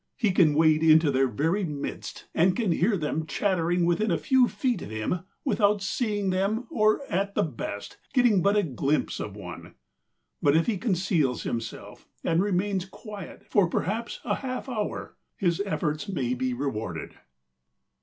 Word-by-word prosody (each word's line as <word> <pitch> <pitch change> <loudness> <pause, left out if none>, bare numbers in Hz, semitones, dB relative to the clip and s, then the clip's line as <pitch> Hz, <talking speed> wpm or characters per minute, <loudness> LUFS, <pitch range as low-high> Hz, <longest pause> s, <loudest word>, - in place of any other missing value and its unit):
He 215 -5 +2
can 165 -5 +4
wade 155 0 +4
into 160 -1 +6
their 135 0 +3
very 160 - 0
midst 150 -5 -5
and 180 +3 +3
can 215 -5 +1
hear 195 +5 +2
them 155 0 -2
chattering 175 -3 +1
within 175 +6 +1
a - - +2
few 260 -2 +4
feet 250 -2 -1
of - - -7
him 110 +11 -2 0.3
without 205 -5 +2
seeing 205 -2 0
them 200 +6 0
or 215 +4 +3
at 200 +3 -1
the - - +3
best 115 -8 -5
getting 245 -8 +4
but 200 +2 +3
a 205 - +3
glimpse 145 0 -1
of 100 -2 -5
one. 90 -4 -9 0.7
But 145 +2 +4
if 165 - +2
he 215 -5 -1
conceals 180 - +1
himself 115 -2 -5 0.2
and 165 +1 +2
remains 195 -1 0
quiet 200 -1 -10
for 195 -5 +4
perhaps 220 +7 -2
a - - +1
half 255 -1 -4
hour 215 -5 -4 0.2
his 175 -1 +1
efforts 155 0 -2
may 130 -10 -1
be 130 0 -1
rewarded. 110 - -4
180 Hz, 165 wpm, -27 LUFS, 150-205 Hz, 0.7 s, into